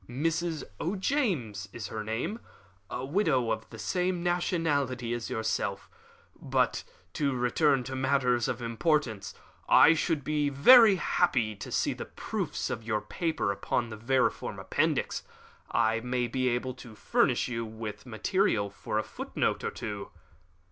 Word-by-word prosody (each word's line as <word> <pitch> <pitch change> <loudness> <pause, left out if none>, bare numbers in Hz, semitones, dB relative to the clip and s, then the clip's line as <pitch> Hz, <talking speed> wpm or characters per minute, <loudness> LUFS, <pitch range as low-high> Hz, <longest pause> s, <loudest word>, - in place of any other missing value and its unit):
"Mrs. 160 +4 -1 0.2
O'James 175 - -1
is 110 0 -6
her 110 -1 -4
name 120 - -3 0.5
a 125 - -4
widow 140 - +1
of 110 0 -3
the 115 - -10
same 180 - -1
nationality 145 -9 0
as 120 -2 -4
yourself. 100 -3 -2 0.5
But - - +1 0.3
to 140 -3 0
return 130 +2 +2
to 130 +2 -5
matters 130 -3 +2
of 120 0 -3
importance, 115 - 0 0.3
I 160 - +8
should 160 -2 0
be 150 0 0
very 210 - +8
happy 125 - +1
to - - -8
see - - +1
the - - -6
proofs - - -4
of - - -3
your 110 -1 -1
paper 165 - -1
upon 115 +4 -1
the - - -5
vermiform 125 +4 0
appendix. - - 0 0.5
I 115 +1 +2
may 125 +1 -1
be 130 +1 0
able 125 +1 -1
to 115 -3 -11
furnish - - +1
you 115 -2 -3
with 110 +1 -7
material 110 - +1
for 105 - -4
a 110 - +1
footnote - - -2
or - - 0
two." 100 -1 -6
125 Hz, 145 wpm, -29 LUFS, 110-160 Hz, 0.5 s, I